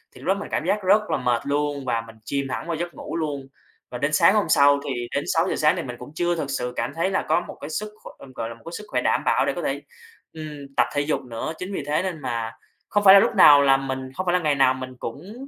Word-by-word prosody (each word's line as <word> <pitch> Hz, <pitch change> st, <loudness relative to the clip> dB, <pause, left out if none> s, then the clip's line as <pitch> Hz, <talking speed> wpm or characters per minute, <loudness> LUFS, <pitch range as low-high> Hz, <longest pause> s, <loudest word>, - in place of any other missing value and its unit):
thì -, -, -13 dB
lúc -, -, -9 dB
đó 190 Hz, -, +4 dB
mình -, -, -7 dB
cảm -, -, -1 dB
giác 205 Hz, +3 st, 0 dB
rất 200 Hz, +3 st, +5 dB
là -, -, +1 dB
mệt 125 Hz, -2 st, 0 dB
luôn 145 Hz, -1 st, -1 dB
và 115 Hz, -2 st, 0 dB
mình 115 Hz, -, -13 dB
chìm 140 Hz, -1 st, -2 dB
thẳng -, -, -4 dB
vào 170 Hz, -, -1 dB
giấc 170 Hz, +1 st, -4 dB
ngủ -, -, -7 dB
luôn. 145 Hz, -4 st, -3 dB, 0.4 s
Và 125 Hz, -, -6 dB
đến 145 Hz, +4 st, -1 dB
sáng 170 Hz, +3 st, +5 dB
hôm 210 Hz, -, +1 dB
sau 140 Hz, -1 st, +5 dB
thì 120 Hz, -3 st, -3 dB
đến 140 Hz, -, 0 dB
6:00 165 Hz, +3 st, +1 dB
sáng, 155 Hz, +3 st, +3 dB
thì 170 Hz, -, -3 dB
mình 125 Hz, -2 st, -6 dB
cũng 125 Hz, -, -10 dB
chưa 175 Hz, +1 st, 0 dB
thực 155 Hz, -4 st, -4 dB
sự 125 Hz, -2 st, -3 dB
cảm -, -, -2 dB
thấy 170 Hz, +3 st, 0 dB
là 195 Hz, -, 0 dB
có -, -, +3 dB
một -, -, -9 dB
cái 145 Hz, -, -6 dB
sức 210 Hz, +7 st, -3 dB
kh -, -, -12 dB
gọi 115 Hz, -, -4 dB
là 115 Hz, -, -8 dB
một 115 Hz, -, -21 dB
cái 165 Hz, -, -7 dB
sức 210 Hz, -, -10 dB
khỏe -, -, -1 dB
đảm -, -, +1 dB
bảo -, -, +3 dB
để -, -, 0 dB
có -, -, -4 dB
thể, -, -, -2 dB, 0.5 s
ừm, 150 Hz, -3 st, -9 dB
tập -, -, +4 dB
thể 145 Hz, -, +1 dB
dục 150 Hz, +1 st, -1 dB
nữa. 125 Hz, +4 st, -5 dB
Chính 185 Hz, +2 st, -6 dB
vì 155 Hz, -, -3 dB
thế 150 Hz, +4 st, +1 dB
nên 185 Hz, -4 st, -4 dB
mà 115 Hz, -3 st, -3 dB, 0.4 s
không 205 Hz, -, +1 dB
phải 190 Hz, -1 st, +9 dB
là 200 Hz, -, +10 dB
lúc -, -, +1 dB
nào 145 Hz, -1 st, +8 dB
là 135 Hz, -1 st, +5 dB
mình 130 Hz, -1 st, -5 dB
không 185 Hz, +6 st, -4 dB
phải 175 Hz, -, +1 dB
là 180 Hz, -, +3 dB
ngày 155 Hz, -4 st, +1 dB
nào 135 Hz, -1 st, +4 dB
mình 130 Hz, 0 st, -7 dB
cũng 215 Hz, -, -8 dB
145 Hz, 295 wpm, -23 LUFS, 135-175 Hz, 0.5 s, là